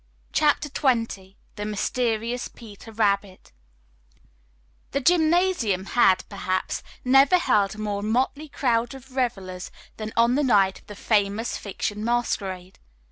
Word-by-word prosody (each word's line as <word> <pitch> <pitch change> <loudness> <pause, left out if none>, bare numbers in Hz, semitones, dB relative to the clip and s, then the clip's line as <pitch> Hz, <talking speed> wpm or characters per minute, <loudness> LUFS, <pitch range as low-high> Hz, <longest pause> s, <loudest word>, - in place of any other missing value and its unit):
CHAPTER 300 -1 +2
XX 230 -9 -1 0.2
THE 205 - -4
MYSTERIOUS 230 +3 -1
"PETER 225 -1 -13
RABBIT" 200 -3 -1 1.4
The 280 - +1
gymnasium 320 - +2
had, 190 -6 +4
perhaps, 185 -2 -2 0.2
never 270 +7 +6
held 210 - +1
a - - -13
more 205 -1 -3
motley 260 +8 -1
crowd 240 -2 0
of 265 0 -14
revelers 195 -8 -2 0.3
than 215 0 -5
on 235 +1 +4
the 290 +3 +2
night 200 -7 +3
of - - -26
the 205 - -9
Famous 205 +2 0
Fiction 210 +1 -4
masquerade. 195 -6 -2
225 Hz, 125 wpm, -24 LUFS, 200-255 Hz, 1.4 s, never